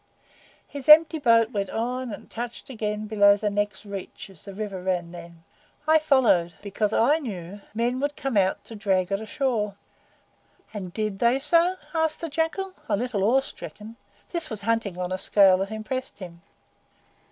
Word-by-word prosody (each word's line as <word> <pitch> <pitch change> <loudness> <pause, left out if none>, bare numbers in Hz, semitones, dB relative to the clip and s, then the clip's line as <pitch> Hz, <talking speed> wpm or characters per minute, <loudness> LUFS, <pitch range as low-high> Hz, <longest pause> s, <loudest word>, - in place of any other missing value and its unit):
His 285 0 -7
empty 315 +1 +8
boat 230 -4 +4
went 200 -3 -2
on 250 +2 -3
and 205 - -9
touched 240 +3 -7
again 215 -2 -3
below 205 -1 +5
the 210 0 -1
next 205 0 -2
reach, 200 -1 -8
as 180 - -16
the 195 - -8
river 200 -3 -5
ran 180 -2 -2
then. 170 -1 -12 0.4
I 315 0 +6
followed, 240 - +3
because 205 +1 -1
I 280 +9 +3
knew 200 - -7
men 240 +3 0
would 285 +1 -1
come 270 -4 -3
out 190 -2 +2
to 225 - -10
drag 190 -3 0
it 195 +1 0
ashore." 225 -5 -1 1.0
"And 190 -4 -6
did 210 0 -3
they 235 0 +4
do - - -1
so?" 340 +5 +3 0.3
said 310 - -8
the 330 - -4
Jackal, 325 +6 -2 0.2
a - - +2
little 230 -4 -2
awe 250 +6 +4
stricken. 220 -4 -10 0.4
This 340 -2 -1
was 215 -3 -5
hunting 225 -4 -1
on 180 0 -3
a 185 - -2
scale 195 -1 +5
that 195 +1 -2
impressed 250 +5 -5
him. 175 -3 -10
215 Hz, 175 wpm, -25 LUFS, 195-260 Hz, 1.0 s, empty